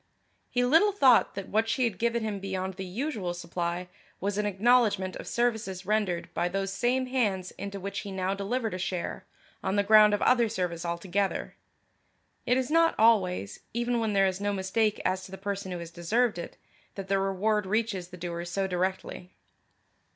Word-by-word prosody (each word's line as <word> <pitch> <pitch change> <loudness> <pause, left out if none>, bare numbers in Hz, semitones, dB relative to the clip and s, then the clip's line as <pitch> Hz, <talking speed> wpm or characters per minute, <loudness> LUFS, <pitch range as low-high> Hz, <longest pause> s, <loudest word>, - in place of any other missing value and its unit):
He 245 0 +1
little 325 +11 +5
thought 265 - +4
that 195 -1 -6
what 220 +2 +1
she 255 - +1
had 220 -6 -1
given 235 0 0
him 210 -2 -3
beyond 190 -1 -3
the 190 +1 -6
usual 195 - -3
supply 175 +1 -3 0.3
was 200 +2 -1
an 210 - +1
acknowledgment 205 -2 +2
of - - -9
services 220 -6 -1
rendered 205 -4 0
by 175 - 0
those 195 +1 -2
same 250 +5 +1
hands 210 -8 -1
into 200 0 -6
which 200 +1 -4
he 200 - -7
now 190 0 -1
delivered 220 +3 -2
a 185 - -4
share, 180 -1 -4 0.4
on 190 - 0
the 205 - +3
ground 210 0 +7
of - - -5
other 235 -3 +4
service 180 -3 -3
altogether. 175 +3 -2 0.9
It 250 +1 +3
is 260 +2 -1
not 330 +1 +4
always, 190 - +2 0.2
even 240 0 0
where 225 -1 0
there 195 -1 +4
is 190 0 -1
no 205 0 0
mistake 200 +3 0
as 185 0 0
to - - -12
the 190 - -7
person 200 0 -4
who 180 - -3
has 170 -1 -8
deserved 200 +5 0
it, - - -7 0.4
that 195 -1 -6
the 195 0 +2
reward 195 +2 0
reaches 210 -3 -1
the 180 0 -11
doer 170 -1 -4
so 190 +3 -2
directly. 185 0 -3
195 Hz, 190 wpm, -28 LUFS, 185-225 Hz, 0.9 s, ground